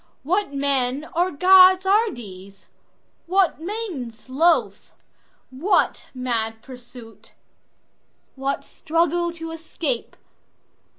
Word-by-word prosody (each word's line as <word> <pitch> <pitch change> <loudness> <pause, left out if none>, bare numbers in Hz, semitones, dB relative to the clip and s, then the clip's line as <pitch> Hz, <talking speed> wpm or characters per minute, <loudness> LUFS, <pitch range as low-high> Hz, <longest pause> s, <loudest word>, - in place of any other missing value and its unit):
What 370 +5 0
men 275 0 -1
or 350 +2 +2
gods 370 +3 +6
are 425 +4 +3
these? 195 -3 -11 0.6
What 370 -3 +1
maidens 330 - -6
loth? 260 - +1 0.6
What 305 +11 0
mad 225 -3 -2
pursuit? 245 -3 -14 1.0
What 275 +1 -3
struggle 340 +1 -1
to 325 -1 -7
escape? 315 -5 -4
285 Hz, 85 wpm, -22 LUFS, 245-350 Hz, 1.0 s, gods